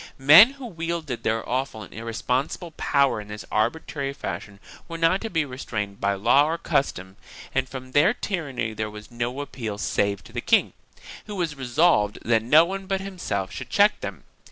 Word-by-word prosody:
1 135 - -15
Men 170 - +10
who 275 -2 -10
wielded 165 - -4
their 115 0 -1
awful 125 -4 -2
and - - -13
irresponsible 125 - -3
power 140 -6 +1
in 105 - -12
this 105 0 -8
arbitrary 135 +4 -1
fashion 100 -7 -6 0.3
were 165 - -6
not 165 +4 +2
to 225 - -4
be 160 -5 0
restrained 105 -7 -5
by 100 0 +1
law 120 +8 +4
or 165 - -1
custom 95 - -2 0.4
and 130 0 0
from 130 -1 -8
their 150 +9 +5
tyranny 145 - -3
there 110 0 -3
was 105 +2 -11
no 120 +3 -3
appeal 115 -7 -5
save 100 -1 -1
to - - -16
the - - -3
king, - - +3 0.5
who 210 - -6
was 170 -5 -1
resolved 125 -5 +2
that 115 -1 +3
no 150 +9 +6
one 195 +1 -5
but 195 0 0
himself 175 - -4
should 130 -1 -7
check 205 +9 +4
them. - - -7
130 Hz, 185 wpm, -24 LUFS, 110-165 Hz, 0.5 s, Men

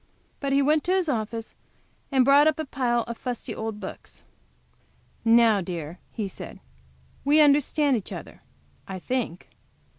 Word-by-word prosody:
But 275 -1 -2
he 275 +1 +4
went 300 +2 +3
to 365 - +2
his 370 -3 +1
office, 225 -4 -3 0.6
and 265 -2 +4
brought 285 +2 +6
up 310 - +2
a 315 - -3
pile 240 -4 0
of 230 0 -7
fusty 250 -2 -4
old 220 -1 -5
books. 190 - -10 1.0
"Now, 225 -3 +5
dear," 170 -1 -6
he 215 -4 -3
said, - - -9 0.6
"we 290 +2 +4
understand 290 -1 +4
each 215 - -4
other - - -8 0.5
I 190 - -5
think. 220 -3 -3
245 Hz, 150 wpm, -26 LUFS, 220-285 Hz, 1.0 s, brought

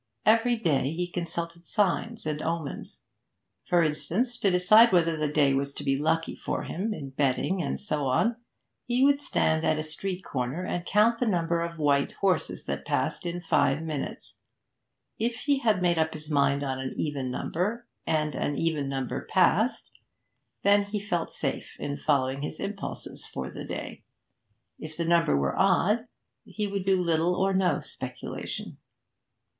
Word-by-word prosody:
Every 230 +2 +4
day 150 - +1
he 175 +2 -1
consulted 170 -1 -5
signs 210 +3 0
and 150 -1 -2
omens. 165 -3 -4 0.7
For 175 -1 +4
instance, 185 +11 -1
to 200 - +3
decide 215 +6 +6
whether 165 -2 +3
the 155 -1 0
day 145 -2 +3
was 140 +1 -1
to - - -6
be 135 -1 +2
lucky 160 +3 0
for - - -3
him 205 +6 -3
in 140 -10 -5
betting 140 +7 +1
and 140 - -2
so 150 -9 -2
on 225 - +2 0.5
he 245 +2 +2
would 285 0 +4
stand 160 - +1
at 155 - +2
a 155 - -2
street 180 +4 -4
corner 130 +6 -2
and 175 0 -3
count 225 +3 +4
the 245 - +1
number 170 -4 +1
of 170 0 -4
white 145 -2 +2
horses 185 -6 0
that - - -3
passed - - -1
in 175 +1 -3
five 160 -2 +2
minutes; 155 -4 -4 0.8
if 230 +1 -1
he 285 -2 +2
had 215 -7 +2
made 175 -2 +3
up 160 0 +1
his 155 0 -8
mind 140 -1 +2
on 135 -1 -2
an 130 0 -4
even 140 -4 -2
number, 205 - -2 0.2
and 155 -1 0
an 145 - -1
even 155 -4 0
number 135 -2 -3
passed, 195 +6 +2 0.7
then 205 0 +5
he 205 +1 -3
felt 180 -5 -2
safe - - -4
in 145 - -3
following 135 -2 +1
his 150 - -5
impulses 200 0 -5
for 65 - -5
the - - -7
day; - - -6 0.8
if 155 0 -8
the 170 - -1
number 170 - +3
were 70 -1 0
odd, 205 +5 +3 0.4
he 210 - -4
would 200 -2 -3
do 190 -1 +3
little 170 +1 +2
or 195 +1 +1
no 190 -1 +2
speculation. - - -6
170 Hz, 170 wpm, -27 LUFS, 150-200 Hz, 0.8 s, decide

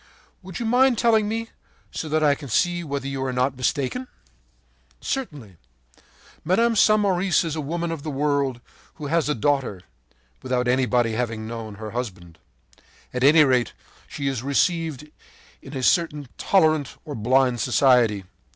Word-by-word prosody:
” - - -36
“Would 185 -2 -8
you 235 - -3
mind 250 +2 +3
telling 220 -2 +3
me, 225 +1 -3 0.4
so 155 - -5
that 155 +1 +1
I 145 -1 +5
can 140 -1 -8
see 175 +8 +1
whether 140 -3 -4
you 135 -1 -3
are 130 - -2
not 130 +1 0
mistaken?” 135 - -2 0.9
“Certainly. 140 - -5 0.9
Mme. 230 +8 +2
Samoris 195 -5 +3
is 160 -2 -3
a 155 - -3
woman 165 +3 -3
of 165 -3 -5
the 155 - -5
world 140 -3 -1 0.3
who 150 - -8
has 160 +1 0
a 150 - +1
daughter, 130 -7 -1 0.6
without 125 -1 -1
anyone 125 -1 +2
having 115 -1 -3
known 110 -2 -7
her 110 +1 -7
husband. 95 -9 -6 0.7
At 125 0 -2
any 150 +3 +7
rate, 130 -4 +1 0.3
she 140 - -4
is 135 -4 -2
received 150 +1 0 0.5
in 135 0 -8
a 130 - -4
certain 150 -2 +1
tolerant, 155 -7 +1
or 150 - -6
blind 125 +1 +2
society. 120 -5 +3
140 Hz, 155 wpm, -23 LUFS, 125-165 Hz, 0.9 s, any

